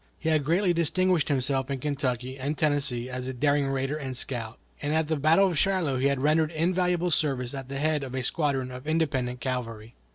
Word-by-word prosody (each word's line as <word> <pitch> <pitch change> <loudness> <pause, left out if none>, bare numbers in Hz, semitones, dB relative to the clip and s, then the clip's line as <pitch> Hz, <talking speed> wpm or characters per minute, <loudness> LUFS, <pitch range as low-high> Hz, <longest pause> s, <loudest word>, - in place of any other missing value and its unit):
He 160 - -2
had 155 -2 +2
greatly 175 +5 +2
distinguished 175 0 +2
himself 135 -1 0
in 140 - -1
Kentucky 130 -2 -2
and 140 +3 -3
Tennessee 145 -5 0
as 130 0 -5
a 130 - -4
daring 145 +2 +2
raider 135 +1 -1
and 130 -4 -5
scout, 115 -4 -3 0.2
and 150 +1 -1
at 160 -1 +1
the 160 - +1
battle 160 +7 +4
of 165 -5 0
Shiloh 175 -9 +1
he 135 - +3
had 140 -1 0
rendered 155 +1 +3
invaluable 180 +1 +1
service 135 -5 0
at 135 -1 -6
the 135 - -4
head 155 +1 +1
of 130 -1 -6
a 130 - -2
squadron 135 -3 -1
of 125 +3 -9
independent 135 -6 0
cavalry. 115 -3 -4
140 Hz, 205 wpm, -27 LUFS, 130-155 Hz, 0.2 s, battle